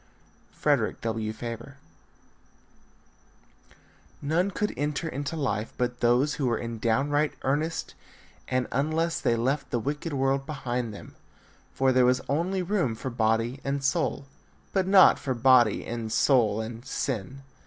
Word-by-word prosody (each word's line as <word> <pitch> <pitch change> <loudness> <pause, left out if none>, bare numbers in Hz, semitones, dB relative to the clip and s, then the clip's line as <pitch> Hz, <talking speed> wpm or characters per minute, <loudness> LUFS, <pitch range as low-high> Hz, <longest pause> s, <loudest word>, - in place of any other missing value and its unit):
Frederick - - 0
W. 110 -1 -2
Faber. 115 +4 -7 2.4
None 165 +7 +1
could 210 +2 -2
enter 150 +2 -2
into 145 +1 -4
life 115 -8 -2
but 125 0 -1
those 125 +5 +3
who 140 -4 -1
were 115 -2 +1
in 115 -1 -5
downright 145 +7 +1
earnest 150 +5 -1 0.5
and 130 0 0
unless 160 +4 0
they 115 - +2
left 135 +5 -1
the - - 0
wicked 145 +7 -3
world 135 0 0
behind 125 -5 -3
them; 100 - -11 0.6
for 135 0 +2
there 130 -1 +4
was 125 0 +3
only 180 +6 0
room 175 - 0
for 130 +3 -5
body 115 +2 0
and 140 0 -2
soul, 140 0 0 0.5
but 190 -2 +1
not 190 -1 +7
for 130 -3 -2
body 120 -3 +4
and 115 -2 -4
soul 110 -6 +3
and 115 +1 -7
sin. 135 +1 -4
130 Hz, 140 wpm, -27 LUFS, 115-145 Hz, 2.4 s, not